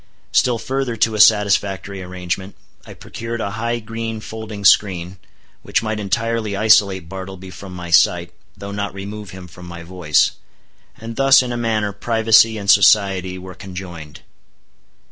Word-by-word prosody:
Still 125 -2 +2
further 130 0 -3
to 115 0 +1
a 105 - -3
satisfactory 100 -2 +3
arrangement, 90 +1 -5 0.3
I - - -11
procured 115 +1 -7
a 100 - -3
high 115 +3 -2
green 115 0 -5
folding 110 -2 -8
screen, 95 -1 +3 0.4
which - - -1
might 110 -1 -2
entirely 115 0 -2
isolate 100 -4 +3
Bartleby 95 0 -8
from 90 +1 -10
my 90 -1 -7
sight, 85 +1 +3 0.2
though 100 0 -7
not 100 -1 -4
remove 100 +1 -7
him 95 -1 -10
from 90 +1 -13
my 85 -1 -9
voice. 85 -4 +1 0.7
And 115 0 -8
thus, 135 -1 +6
in 125 - -4
a - - -2
manner, 110 -3 -1
privacy 110 +1 +3
and 100 -1 -7
society 95 -2 +4
were 95 0 -9
conjoined. 90 -5 -9
100 Hz, 150 wpm, -19 LUFS, 95-110 Hz, 0.7 s, thus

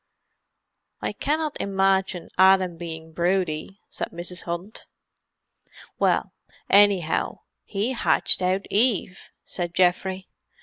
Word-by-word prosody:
"I - - -2
cannot 305 0 -2
imagine 195 -2 0
Adam 190 -1 +5
being 160 -1 -8
broody," 180 +1 -1
said - - -3
Mrs. 175 +1 -6
Hunt. 175 +5 -6 1.1
"Well, - - +1 0.4
anyhow, 200 -5 +3 0.2
he 210 +5 -2
hatched 240 - +1
out 185 +2 0
Eve!" 205 -4 0 0.2
said 175 -1 -4
Geoffrey. 185 +1 +1
185 Hz, 95 wpm, -24 LUFS, 175-195 Hz, 1.1 s, Adam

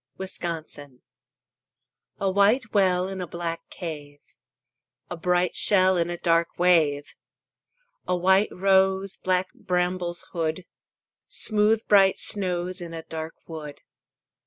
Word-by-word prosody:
INCANTATION 160 -8 -7 1.2
A 195 -1 0
white 210 +5 +2
well 185 -3 +2
In 190 -1 -6
a 180 - -5
black 165 0 -5
cave; 150 -5 -8 0.9
A - - -3
bright 180 +1 0
shell 185 -2 +4
In 170 -1 0
a 175 - -4
dark 170 -1 +1
wave. 160 -5 +2 0.9
A 180 - +1
white 190 +3 +3
rose 190 0 +2
Black 185 0 -1
brambles 180 -1 -2
hood; 165 +1 -2 0.6
Smooth 215 +1 +2
bright 195 -2 +5
snows 185 -2 -1
In 170 -1 -7
a 165 - -7
dark 160 0 -7
wood. 150 -3 -9
180 Hz, 115 wpm, -25 LUFS, 165-190 Hz, 1.2 s, bright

